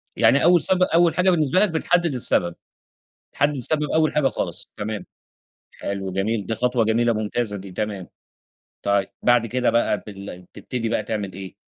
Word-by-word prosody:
يعني 140 Hz, -, +4 dB
أول 175 Hz, 0 st, +5 dB
سب 185 Hz, -1 st, +2 dB
أول 170 Hz, -2 st, +3 dB
حاجة 180 Hz, +1 st, +3 dB
بالنسبة 160 Hz, -2 st, +2 dB
لك 210 Hz, +1 st, +4 dB
بتحدّد 170 Hz, 0 st, +1 dB
السبب، 85 Hz, -7 st, 0 dB, 0.8 s
بتحدّد 145 Hz, +1 st, +1 dB
السبب 150 Hz, +4 st, -1 dB
أول 160 Hz, -1 st, +3 dB
حاجة 150 Hz, -3 st, +3 dB
خالص، -, -, -4 dB
تمام، 105 Hz, -2 st, -4 dB, 0.7 s
حلو، 95 Hz, -1 st, -5 dB
جميل، 100 Hz, +2 st, -1 dB
دي 115 Hz, -, -2 dB
خطوة 125 Hz, -1 st, +1 dB
جميلة، 115 Hz, +2 st, +2 dB
ممتازة 110 Hz, 0 st, -2 dB
دي، 95 Hz, 0 st, -9 dB
تمام، 100 Hz, -2 st, -4 dB, 0.8 s
طيب 100 Hz, -1 st, +1 dB
بعد 120 Hz, -1 st, +4 dB
كده 125 Hz, +2 st, 0 dB
بقى 115 Hz, -3 st, +1 dB
بال 100 Hz, -3 st, -8 dB
بتبتدي 115 Hz, +5 st, -5 dB
بقى 110 Hz, -1 st, 0 dB
تعمل 105 Hz, -2 st, -4 dB
إيه. 95 Hz, 0 st, -8 dB
115 Hz, 165 wpm, -23 LUFS, 100-150 Hz, 0.8 s, أول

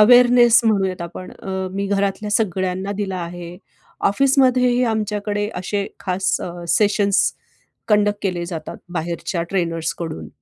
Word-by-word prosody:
Awareness 245 Hz, +1 st, +7 dB
म्हणूयात 190 Hz, -5 st, +1 dB
आपण 180 Hz, +2 st, -8 dB
अ, 190 Hz, -1 st, -4 dB
मी 200 Hz, +1 st, -2 dB
घरातल्या 200 Hz, +1 st, -1 dB
सगळ्यांना 190 Hz, -2 st, 0 dB
दिला 190 Hz, -2 st, -3 dB
आहे. 175 Hz, 0 st, -7 dB, 0.5 s
ऑफिसमध्येही 255 Hz, 0 st, +3 dB
आमच्याकडे 210 Hz, -1 st, -2 dB
असे 200 Hz, +2 st, -2 dB
खास 190 Hz, 0 st, 0 dB
अ, -, -, -4 dB, 0.2 s
सेशन्स 205 Hz, -1 st, +3 dB, 0.6 s
कंडक्ट 205 Hz, -1 st, +3 dB
केले 180 Hz, -3 st, -1 dB
जातात 165 Hz, -3 st, -6 dB, 0.2 s
बाहेरच्या 170 Hz, +1 st, -3 dB
ट्रेनर्सकडून. 165 Hz, -3 st, -2 dB
195 Hz, 115 wpm, -20 LUFS, 180-210 Hz, 0.6 s, Awareness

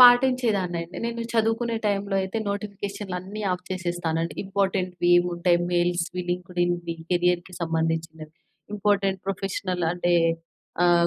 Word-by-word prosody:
పాటించేదాన్ని 245 Hz, -8 st, +6 dB
అండి. 170 Hz, +2 st, -10 dB
నేను 235 Hz, 0 st, -3 dB
చదువుకునే 225 Hz, +1 st, +1 dB
టైంలో 200 Hz, -1 st, 0 dB
అయితే, 190 Hz, +4 st, -2 dB
నోటిఫికేషనులు 200 Hz, -1 st, -4 dB
అన్ని 205 Hz, +3 st, -6 dB
ఆఫ్ 180 Hz, 0 st, -4 dB
చేసేస్తానండి. 175 Hz, -3 st, -1 dB
ఇంపార్టెంట్‌వి 190 Hz, -3 st, 0 dB
ఏముంటాయి, 175 Hz, 0 st, +2 dB
మెయిల్స్‌వి 175 Hz, +1 st, +1 dB
లింక్డ్‌ఇన్‌వి 175 Hz, -1 st, -1 dB, 0.2 s
కేరియర్‌కి 180 Hz, +1 st, +1 dB
సంబంధించినవి 160 Hz, -1 st, -2 dB, 0.4 s
ఇంపార్టెంట్ 195 Hz, -2 st, +1 dB
ప్రొఫెషనల్ 185 Hz, -2 st, -2 dB
అంటే 175 Hz, 0 st, +1 dB, 0.7 s
ఆహ్, 170 Hz, -1 st, +5 dB
180 Hz, 110 wpm, -25 LUFS, 175-200 Hz, 0.7 s, పాటించేదాన్ని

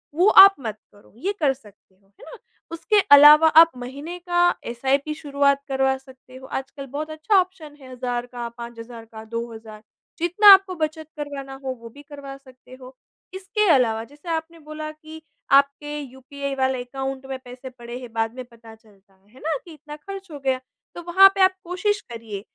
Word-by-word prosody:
वो 360 Hz, +5 st, +3 dB, 0.2 s
आप 390 Hz, 0 st, +6 dB
मत 220 Hz, -5 st, -6 dB
करो। 205 Hz, -, -22 dB
ये 385 Hz, +11 st, -3 dB
कर 285 Hz, -4 st, +2 dB
सकते 210 Hz, -6 st, -21 dB
हो, 195 Hz, +1 st, -34 dB
है 195 Hz, -, -19 dB
ना? -, -, -12 dB, 0.3 s
उसके 410 Hz, +6 st, +1 dB
अलावा 295 Hz, +2 st, +9 dB
आप 325 Hz, +1 st, +7 dB
महीने 280 Hz, +8 st, -8 dB
का 350 Hz, 0 st, -2 dB, 0.3 s
एसआईपी 270 Hz, +5 st, -1 dB
शुरुआत 280 Hz, -2 st, 0 dB
करवा 265 Hz, -1 st, 0 dB
सकते 260 Hz, -1 st, -18 dB
हो। 260 Hz, -, -11 dB
आजकल 275 Hz, +1 st, -6 dB
बहुत 295 Hz, +4 st, -6 dB
अच्छा 310 Hz, +7 st, -1 dB
ऑप्शन 360 Hz, -5 st, -5 dB
है 260 Hz, -2 st, -13 dB
हज़ार 245 Hz, -1 st, -4 dB
का, 240 Hz, -1 st, -7 dB
5 235 Hz, 0 st, -10 dB
हज़ार 230 Hz, 0 st, -10 dB
का, 220 Hz, -1 st, -12 dB
2 230 Hz, +1 st, -5 dB
हज़ार 220 Hz, -1 st, -12 dB, 0.4 s
जितना 360 Hz, +5 st, +2 dB
आपको 385 Hz, -1 st, +3 dB
बचत 315 Hz, -1 st, -4 dB
करवाना 280 Hz, -2 st, -7 dB
हो 265 Hz, -, -3 dB
वो 230 Hz, -, -10 dB
भी 285 Hz, +6 st, -15 dB
करवा 280 Hz, -2 st, -10 dB
सकते 255 Hz, -2 st, -20 dB
हो। 255 Hz, +1 st, -13 dB, 0.4 s
इसके 395 Hz, +3 st, -1 dB
अलावा 225 Hz, -4 st, +1 dB
जैसे 290 Hz, +8 st, -13 dB
आपने 330 Hz, 0 st, -4 dB
बोला 305 Hz, 0 st, -8 dB
कि 310 Hz, +1 st, -13 dB, 0.4 s
आपके 280 Hz, +1 st, -1 dB
यूपीआई 275 Hz, +1 st, -7 dB
वाले 260 Hz, -1 st, -1 dB
अकाउंट 270 Hz, +1 st, -6 dB
में 265 Hz, 0 st, -5 dB
पैसे 250 Hz, +1 st, -10 dB
पड़े 240 Hz, -1 st, -10 dB
हैं 245 Hz, -3 st, -11 dB
बाद 225 Hz, 0 st, -2 dB
में 255 Hz, -, -7 dB
पता 230 Hz, -2 st, -16 dB
चलता 205 Hz, -3 st, -26 dB, 0.2 s
है 255 Hz, +4 st, -19 dB
ना 320 Hz, 0 st, -2 dB
कि 335 Hz, -, -12 dB
इतना 300 Hz, 0 st, -11 dB
ख़र्च 390 Hz, +5 st, -10 dB
हो 290 Hz, -, -8 dB
गया। 265 Hz, -1 st, -1 dB, 0.4 s
तो -, -, -7 dB
वहाँ 385 Hz, +3 st, +7 dB
पे 390 Hz, -, 0 dB
आप 375 Hz, 0 st, +5 dB
कोशिश 405 Hz, +4 st, -2 dB
करिए 225 Hz, -4 st, -7 dB
275 Hz, 195 wpm, -22 LUFS, 245-315 Hz, 0.4 s, अलावा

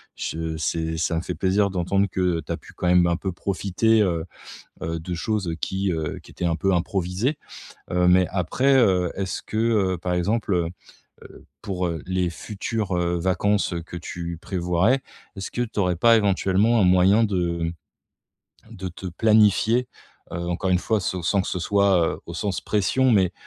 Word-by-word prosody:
je 80 Hz, 0 st, -4 dB
c'est 80 Hz, +1 st, -2 dB
ça 85 Hz, +1 st, 0 dB
me 80 Hz, -, 0 dB
fait 90 Hz, 0 st, -5 dB
plaisir 100 Hz, +2 st, +2 dB
d'entendre 95 Hz, +2 st, 0 dB
que, 95 Hz, -, -5 dB, 0.2 s
heu, -, -, -5 dB
tu -, -, -6 dB
as -, -, -1 dB
pu -, -, -16 dB
quand 90 Hz, -, -3 dB
même 90 Hz, 0 st, +5 dB
un 85 Hz, -, +1 dB
peu 95 Hz, +1 st, -3 dB
profiter, 100 Hz, +4 st, +1 dB
heu 85 Hz, -5 st, 0 dB, 0.6 s
heu, 80 Hz, +1 st, -3 dB
de 90 Hz, +3 st, -5 dB
choses, 100 Hz, +2 st, -2 dB
heu, 80 Hz, -, -2 dB
qui, 95 Hz, +4 st, -2 dB
heu, 80 Hz, -2 st, -3 dB
qui -, -, -16 dB
étaient 90 Hz, -, -4 dB
un 85 Hz, -1 st, +1 dB
peu 95 Hz, +4 st, +1 dB
improvisées. 95 Hz, -, -1 dB, 0.6 s
Heu, 90 Hz, 0 st, +2 dB
mais 90 Hz, 0 st, +5 dB
après, 100 Hz, +9 st, +1 dB
heu, 90 Hz, -8 st, +3 dB
est-ce 95 Hz, -1 st, -3 dB
que, -, -, -7 dB
heu, 105 Hz, -5 st, +1 dB
par 90 Hz, +1 st, -2 dB
exemple, 90 Hz, -2 st, 0 dB, 0.6 s
heu, -, -, -13 dB, 0.2 s
pour, 95 Hz, -3 st, -2 dB
heu, 85 Hz, -2 st, -4 dB
les 90 Hz, -1 st, 0 dB
futures, 105 Hz, +1 st, -3 dB
heu, 85 Hz, 0 st, 0 dB
vacances 95 Hz, +2 st, +1 dB
que 85 Hz, -, -7 dB
tu 85 Hz, 0 st, -6 dB
prévoirais, 90 Hz, +8 st, +1 dB, 0.3 s
est-ce 95 Hz, -1 st, -6 dB
que 120 Hz, -, -2 dB
tu 115 Hz, -3 st, -3 dB
aurais 90 Hz, -2 st, +2 dB
pas 115 Hz, +7 st, +5 dB
éventuellement 100 Hz, +2 st, +2 dB
un -, -, +4 dB
moyen 95 Hz, +4 st, +5 dB
de, 85 Hz, -5 st, -1 dB, 1.0 s
mmh, -, -, -11 dB
de 95 Hz, 0 st, -5 dB
te 90 Hz, +2 st, -9 dB
planifier, 110 Hz, +5 st, +3 dB, 0.4 s
heu, -, -, -3 dB
encore 95 Hz, +2 st, -1 dB
1 90 Hz, -, +4 dB
fois 110 Hz, +3 st, 0 dB
se 90 Hz, 0 st, -2 dB
sans 95 Hz, +4 st, +2 dB
que -, -, -6 dB
ce -, -, -2 dB
soit, 95 Hz, -2 st, +2 dB
heu, -, -, -11 dB
au 85 Hz, -, -7 dB
sens 95 Hz, +1 st, -2 dB
pression, 125 Hz, +6 st, +2 dB
mais 95 Hz, -6 st, +3 dB
95 Hz, 190 wpm, -24 LUFS, 85-105 Hz, 1.0 s, même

